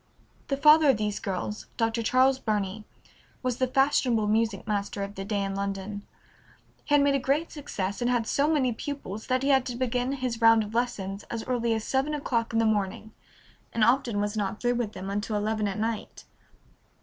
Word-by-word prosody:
The 275 - -1
father 300 +1 +6
of 260 - +4
these 210 -1 -2
girls, 195 +2 -4
Dr. 225 0 0
Charles 260 +3 +3
Burney, 210 -2 -2 0.6
was 250 -2 -1
the 255 - +1
fashionable 255 -4 +2
music 215 -1 0
master 205 -1 -2
of 200 0 -6
the 195 - -6
day 200 0 -1
in 195 0 -3
London. 200 +1 -4 0.8
He 290 - +3
had 285 - +5
made 285 0 +3
a 275 - +2
great 280 +5 0
success, 200 -10 -4
and 240 - +1
had 240 -2 +1
so 285 +6 +1
many 260 -6 +2
pupils 220 -5 -6
that 255 0 +1
he 275 - +1
had 265 -2 +5
to 245 - -4
begin 250 +1 -1
his 250 -4 -3
round 225 -1 +6
of 210 +1 -8
lessons 205 -5 -2
as 230 -1 -4
early 235 -2 0
as 220 - -3
seven 275 +5 0
o'clock 235 -5 -1
in 225 - 0
the 225 - +3
morning, 215 0 -1 0.6
and 225 - +2
often 240 -2 +2
was 205 +1 -1
not 205 -1 -2
through 245 0 +1
with 235 -3 -2
them 195 +1 -6
until 205 +2 -2
eleven 215 0 0
at 195 - -3
night. 220 0 -3
225 Hz, 200 wpm, -27 LUFS, 205-255 Hz, 0.8 s, father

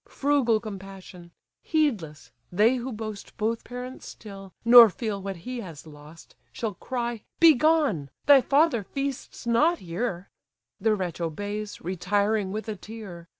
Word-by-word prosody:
Frugal 270 -6 +2
compassion! 195 -4 -10 0.3
Heedless, 220 - -1 0.2
they 215 +8 +3
who 250 +2 -5
boast 215 -2 -7
Both 225 +1 -1
parents 250 +1 -8
still, 195 -3 -11
nor 235 -1 +10
feel 210 -2 -4
what 195 0 -5
he 250 -1 -4
has 165 -9 -9
lost, 150 +1 -14 0.2
Shall 220 -3 -4
cry, 240 +2 -4 0.2
'Begone! 305 - +4 0.2
thy 280 -2 +7
father 280 -4 +2
feasts 275 +3 -5
not 300 +9 +3
here:' 180 - -4 0.5
The 220 -1 +2
wretch 180 -4 -4
obeys, 205 +6 -4
retiring 200 +3 0
with 215 +2 -5
a 215 - -3
tear. 200 -5 -10
215 Hz, 135 wpm, -26 LUFS, 190-245 Hz, 0.5 s, nor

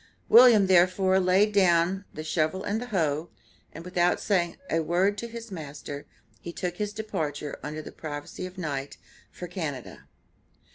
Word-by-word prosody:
William 235 -4 +8
therefore 185 +1 +4
laid 190 +3 +3
down 185 0 +3
"the 155 - -7
shovel 155 +4 -1
and 210 +2 -2
the 245 - -6
hoe," 165 -6 -1 0.4
and, 165 - -10
without 180 -1 +1
saying 175 -5 0
a 165 - +1
word 180 +5 +1
to 235 - -5
his 230 -1 -9
master, 145 -4 -7 0.3
he 170 - -7
took 175 0 -4
his 210 -1 -2
departure, 155 -9 -4
under 155 +1 -6
the - - -9
privacy 150 +3 -6
of 185 - -13
the 185 - -7
night, 140 -3 -4 0.3
for 180 - -8
Canada. 160 -8 -6
180 Hz, 160 wpm, -27 LUFS, 155-195 Hz, 0.4 s, William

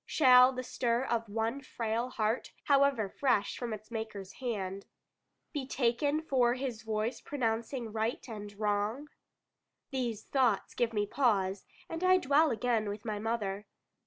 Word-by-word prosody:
Shall 255 -3 +7
the 255 -1 -4
stir 240 0 0
of 230 -4 -1
one 225 +5 -1
frail 235 -1 -2
heart, 220 0 -1
however 275 -6 +3
fresh 205 -1 +1
from 240 -2 -4
its 215 +1 -7
Maker's 215 -4 -5
hand, 200 -5 -3 0.7
be 280 -4 -3
taken 280 +5 +1
for 250 -5 +2
His 255 -4 -4
voice 220 +2 -2
pronouncing 235 -2 -2
right 225 +3 -2
and 210 -3 -7
wrong? 215 +7 -1 0.8
These 240 -5 -2
thoughts 250 -7 +1
give 235 -2 0
me 210 -2 0
pause, 205 -6 +1 0.2
and 330 +2 -5
I 370 0 +6
dwell 300 0 +4
again 230 -2 0
with 205 +1 -6
my 210 -2 -2
mother. 210 -2 -2
235 Hz, 145 wpm, -31 LUFS, 215-260 Hz, 0.8 s, Shall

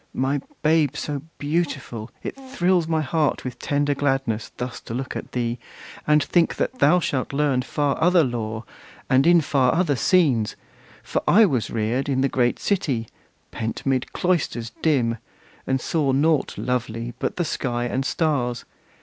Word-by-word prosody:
My 135 +2 0 0.2
babe 150 -3 +3
so 145 -2 -3 0.2
beautiful! 145 -7 -2
it - - -4
thrills 185 -11 0
my 160 -1 +1
heart 155 0 0
With 125 - -5
tender 145 0 +1
gladness, 135 -6 -1
thus 125 0 -4
to 115 - -7
look 130 +1 -4
at - - -6
thee, 120 -1 -1 0.5
And 150 0 +4
think 175 -2 +2
that 255 - -2
thou 180 - +5
shalt 140 -5 -2
learn 140 -3 +2
far 145 +2 -1
other 175 -1 +5
lore, 110 -3 -3 0.5
And 135 +4 +5
in 170 -1 +6
far 140 -2 +2
other 165 -5 +2
scenes! 130 - +2 0.5
For - - -1
I 215 +4 +7
was 130 - 0
reared 115 +5 -1
In 130 -1 +1
the 135 - +2
great 125 -2 +1
city, 135 - -1 0.4
pent 110 0 -4
'mid 130 -2 0
cloisters 145 -10 -1
dim, 120 -8 +2 0.5
And 130 0 +1
saw 145 0 0
nought 150 +1 +2
lovely 120 -1 -2
but - - -2
the 175 - -1
sky 120 -5 -2
and 130 +2 -1
stars. 130 -4 -1
135 Hz, 160 wpm, -23 LUFS, 125-160 Hz, 0.5 s, I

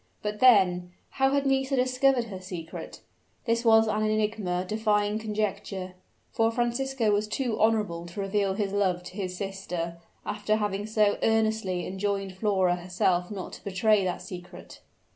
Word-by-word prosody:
But 210 0 -3
then, 180 -8 +4 0.3
how 270 0 +5
had 280 0 +1
Nisida 270 -1 +2
discovered 255 -2 +2
the 185 -1 -6
secret? 175 -3 -8 0.4
This 230 -1 +1
was 225 -1 +6
an 215 0 0
enigma 210 -4 0
defying 210 0 +1
conjecture; 205 -3 -3 0.4
for 225 0 +2
Francisco 240 0 0
was 205 +1 +1
too 235 +1 -2
honorable 210 -6 +1
to 170 +4 -8
reveal 195 0 0
his 200 -1 -2
love 185 -3 +1
to 180 - -10
his 185 -3 -4
sister, 180 -4 -4 0.3
after 210 0 0
having 205 -1 -2
so 215 -2 +2
earnestly 220 -5 +1
enjoined 195 0 -2
Flora 190 -3 +1
herself 180 0 0
not 200 -3 -6
to - - -10
betray 200 +1 +2
that 180 -1 -2
secret. 180 -1 -10
205 Hz, 150 wpm, -27 LUFS, 185-220 Hz, 0.4 s, was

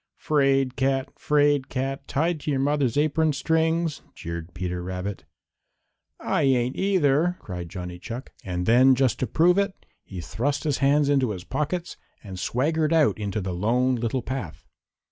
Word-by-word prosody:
"'Fraid 135 -3 +2
cat! 135 0 0
'Fraid 145 -2 +2
cat! 135 +1 -3
Tied 160 +3 0
to 150 - -5
your 135 -2 +1
mother's 140 -2 +1
apron 155 +1 +2
strings!" 160 +1 0
jeered 85 +1 -6
Peter 90 0 -3
Rabbit. 95 +2 -5 0.9
"I - - 0
ain't 130 -2 +2
either!" 175 -3 +2
cried 90 -3 -7
Johnny 90 0 -7
Chuck. 120 +7 -7
And 90 -1 -3
then, 130 +4 +6
just 130 -1 +1
to 130 - -1
prove 175 +4 +3
it, 200 -1 -2 0.2
he 95 - -8
thrust 130 +11 -2
his 150 -4 0
hands 140 +1 +3
into 135 -4 +2
his 95 -4 -5
pockets 150 - -3 0.3
and 95 -2 -8
swaggered 155 - 0
out 155 -8 +3
into 105 0 -2
the 95 -1 -3
Lone 120 +8 +1
Little 120 +1 -1
Path. 130 - -6
135 Hz, 160 wpm, -25 LUFS, 105-150 Hz, 0.9 s, then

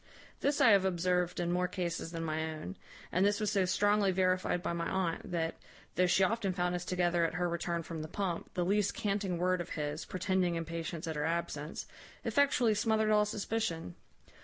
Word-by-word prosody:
This 285 +1 +1
I 265 -5 +7
have 200 -2 +6
observed 180 -1 +1
in 175 0 0
more 180 +1 +1
cases 175 -3 -3
than 165 -1 -4
my 160 0 -1
own; 95 - -7 0.4
and 180 - +2
this 205 +1 +3
was 210 -1 0
so 195 -3 +2
strongly 205 +2 +3
verified 185 -1 +1
by - - -1
my 170 0 -2
aunt, 185 -3 -1
that, 165 -2 -1 0.4
though 180 0 +3
she 180 +2 +4
often 200 -1 +1
found 180 0 0
us 180 0 -2
together 175 -1 +1
at 165 - 0
her 180 0 +1
return 170 0 -2
from 160 -1 -6
the 155 - -5
pump, 185 -1 -3
the 175 - +1
least 200 +1 +1
canting 200 -3 -1
word 180 +1 +1
of 175 - -7
his, 150 +1 -2
pretending 185 -2 0
impatience 165 0 -4
at 160 -1 -3
her 150 0 -1
absence, 160 -2 -3 0.4
effectually 265 -6 +3
smothered 220 0 +2
all 210 0 +5
suspicion. 210 - -2
180 Hz, 195 wpm, -32 LUFS, 170-200 Hz, 0.4 s, I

